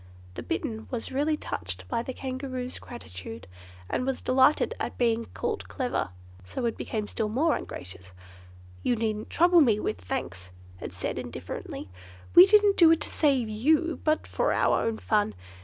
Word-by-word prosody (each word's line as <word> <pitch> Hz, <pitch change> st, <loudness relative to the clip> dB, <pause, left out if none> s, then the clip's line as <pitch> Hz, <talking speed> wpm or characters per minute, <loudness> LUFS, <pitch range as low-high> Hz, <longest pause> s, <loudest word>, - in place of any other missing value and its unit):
The -, -, -6 dB
Bittern 235 Hz, -10 st, -3 dB
was 240 Hz, -3 st, -4 dB
really 295 Hz, +3 st, +1 dB
touched 95 Hz, -, -5 dB
by 230 Hz, -, -1 dB
the 250 Hz, -, -5 dB
Kangaroo's 260 Hz, -1 st, -5 dB
gratitude, 110 Hz, -, -9 dB, 0.4 s
and -, -, -1 dB
was 265 Hz, 0 st, -2 dB
delighted 260 Hz, +3 st, +4 dB
at -, -, -4 dB
being 230 Hz, -1 st, +1 dB
called 450 Hz, -3 st, -3 dB
clever, 250 Hz, -, -2 dB, 0.3 s
so 240 Hz, -, -4 dB
it 230 Hz, -, 0 dB
became 215 Hz, -2 st, -3 dB
still 215 Hz, 0 st, -2 dB
more 295 Hz, +9 st, +2 dB
ungracious. 90 Hz, 0 st, -8 dB, 0.7 s
"You 245 Hz, -, +1 dB
needn't 215 Hz, -1 st, -2 dB
trouble 345 Hz, +1 st, +5 dB
me 225 Hz, -7 st, +4 dB
with 90 Hz, -, -3 dB
thanks," 90 Hz, 0 st, -4 dB, 0.3 s
it -, -, -6 dB
said -, -, -4 dB
indifferently, 100 Hz, -, -6 dB, 0.5 s
"we 360 Hz, +2 st, +10 dB
didn't 415 Hz, -1 st, +5 dB
do 335 Hz, -2 st, +8 dB
it 325 Hz, -1 st, +4 dB
to -, -, -1 dB
save 270 Hz, -6 st, +2 dB
you, 305 Hz, +10 st, +1 dB
but 310 Hz, 0 st, +1 dB
for -, -, 0 dB
our -, -, +2 dB
own 225 Hz, -1 st, -1 dB
fun. 210 Hz, -1 st, +1 dB
245 Hz, 165 wpm, -27 LUFS, 210-300 Hz, 0.7 s, we